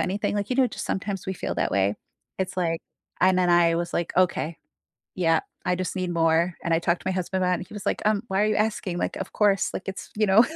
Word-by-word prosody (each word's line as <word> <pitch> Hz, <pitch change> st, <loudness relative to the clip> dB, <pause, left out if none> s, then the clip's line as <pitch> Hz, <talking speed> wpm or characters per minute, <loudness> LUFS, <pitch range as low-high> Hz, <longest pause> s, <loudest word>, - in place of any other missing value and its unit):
anything, 195 Hz, +3 st, -1 dB
like, 205 Hz, +2 st, -2 dB
you 250 Hz, -, 0 dB
know, 265 Hz, -, +5 dB
just 230 Hz, -, -6 dB
sometimes 195 Hz, 0 st, -3 dB
we 190 Hz, -, -2 dB
feel -, -, -3 dB
that -, -, 0 dB
way? 100 Hz, +1 st, +2 dB, 0.4 s
It's 190 Hz, -1 st, -2 dB
like 165 Hz, -2 st, 0 dB, 0.4 s
I 185 Hz, -, +6 dB
And 185 Hz, -, +3 dB
then 180 Hz, -1 st, +3 dB
I 170 Hz, -1 st, +5 dB
was 170 Hz, 0 st, -2 dB
like, 170 Hz, -, -1 dB
"Okay, 175 Hz, -3 st, +2 dB, 0.6 s
yeah, 165 Hz, -3 st, +3 dB, 0.2 s
I 180 Hz, -, +2 dB
just 185 Hz, 0 st, -3 dB
need 185 Hz, -2 st, -2 dB
more." 165 Hz, +1 st, +2 dB
And 170 Hz, -, +2 dB
I 165 Hz, -, +3 dB
talked 170 Hz, +1 st, 0 dB
to -, -, -3 dB
my -, -, +1 dB
husband 185 Hz, 0 st, -1 dB
about 180 Hz, -, +2 dB
it -, -, +4 dB
and 185 Hz, -, -7 dB
he -, -, -12 dB
was 205 Hz, -, -7 dB
like, -, -, 0 dB
"Um, 210 Hz, -1 st, +2 dB
why 195 Hz, +2 st, +1 dB
are -, -, +3 dB
you 215 Hz, -, +1 dB
asking? 210 Hz, -4 st, -1 dB
like, -, -, -2 dB
"Of -, -, -5 dB
course," 200 Hz, -2 st, +2 dB
like -, -, -5 dB
it's, 190 Hz, -, -6 dB
you 215 Hz, 0 st, +3 dB
know. 205 Hz, +4 st, +6 dB
185 Hz, 275 wpm, -25 LUFS, 170-200 Hz, 0.6 s, I